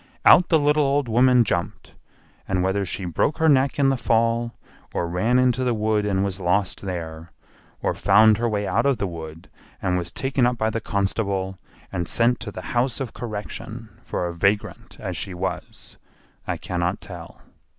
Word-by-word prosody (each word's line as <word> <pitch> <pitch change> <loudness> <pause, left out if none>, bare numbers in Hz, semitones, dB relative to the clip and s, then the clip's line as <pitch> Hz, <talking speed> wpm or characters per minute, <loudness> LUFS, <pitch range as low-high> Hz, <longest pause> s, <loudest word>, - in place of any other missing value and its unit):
Out 175 - +7
the 165 - +5
little 150 0 +3
old 140 -1 +1
woman 125 +2 +5
jumped, 85 -5 -3 0.5
and 95 -1 0
whether 95 +2 +1
she 95 +1 -4
broke 90 - 0
her 160 -1 +2
neck 135 -2 +3
in 140 -1 +4
the 135 - +2
fall 115 0 +1 0.4
or 85 - 0
ran 95 +9 +1
into 130 0 +2
the 125 -2 +1
wood 105 -1 0
and 95 -1 +1
was 95 -1 -4
lost 90 +1 0
there, 85 -3 -6 0.5
or - - +1
found 110 0 +5
her 120 0 +1
way 105 -1 -1
out - - +1
of 135 -3 +2
the 100 - -1
wood 80 -1 -8 0.3
and 90 -1 0
was 85 -1 -4
taken 135 -2 +1
up 125 0 -1
by 110 0 0
the 115 - -3
constable 100 -2 -1 0.3
and 90 -3 -3
sent 120 0 +2
to 110 -2 -6
the - - -8
House 120 0 0
of 135 -4 -4
Correction 110 0 -6
for - - -3
a 85 - -3
vagrant 100 +4 -1
as 90 - -4
she 90 +3 -5
was, 95 +2 -5 0.5
I - - -1
cannot 90 +2 -2
tell. 85 -3 -10
105 Hz, 185 wpm, -23 LUFS, 90-120 Hz, 0.5 s, Out